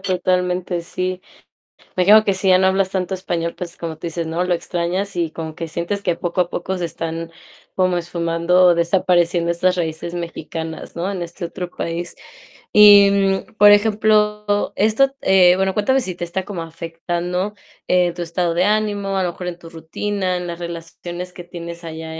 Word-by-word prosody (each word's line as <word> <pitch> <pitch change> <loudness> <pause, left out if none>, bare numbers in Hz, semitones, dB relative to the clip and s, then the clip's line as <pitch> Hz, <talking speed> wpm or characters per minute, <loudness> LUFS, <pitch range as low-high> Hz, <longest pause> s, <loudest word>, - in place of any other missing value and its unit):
totalmente, 180 -1 0
sí. 185 +2 -4 0.8
Me 185 - +1
imagino 215 +4 +6
que 200 - +2
si 190 +1 -1
ya 185 - +7
no 190 - +2
hablas 190 0 +2
tanto 190 -1 -2
español, 170 -3 -2
pues 180 -1 -7
como 165 -2 -5
tú 170 - -6
dices, 165 0 -3
¿no?, 165 +2 -1
lo 180 -1 +1
extrañas 180 +3 -3
y 170 -2 0
como 160 0 -6
que 165 +1 -6
sientes 170 +5 -3
que 175 -4 0
poco 175 +1 -1
a 175 - -1
poco 185 +2 -3
se 175 - -1
están 165 0 -5 0.5
como 185 -1 +2
esfumando 170 +1 +1
o 175 - +7
desapareciendo 170 0 +2
estas 180 +2 +1
raíces 170 0 -3
mexicanas, 165 -1 -6
¿no?, 180 +4 -2
en 190 -3 -4
este 170 +1 -6
otro 175 +1 -6
país. 170 0 -5 0.6
Y, 205 -1 +8
mm, 195 0 0
por 205 0 +8
ejemplo, 210 -1 +2
esto, 245 +6 +2
eh, 185 -2 +5
bueno, 190 0 +1
cuéntame 265 +6 +2
si 185 -7 -4
te 175 - -6
está 180 +2 -4
como 185 -5 -5
afectando, 175 +4 -4 0.3
eh, 180 -1 +3
tu 175 0 -4
estado 170 0 -1
de 175 - +3
ánimo, 205 -2 0
a - - +1
lo 175 - -1
mejor 180 - -8
en 175 -1 -5
tu 165 - -12
rutina, 185 +3 -3
en 180 0 -5
las 170 -1 -5
relaciones 175 +1 -7
que 175 - -9
tienes 170 -1 -8
allá 160 0 -7
180 Hz, 190 wpm, -20 LUFS, 170-190 Hz, 0.8 s, Y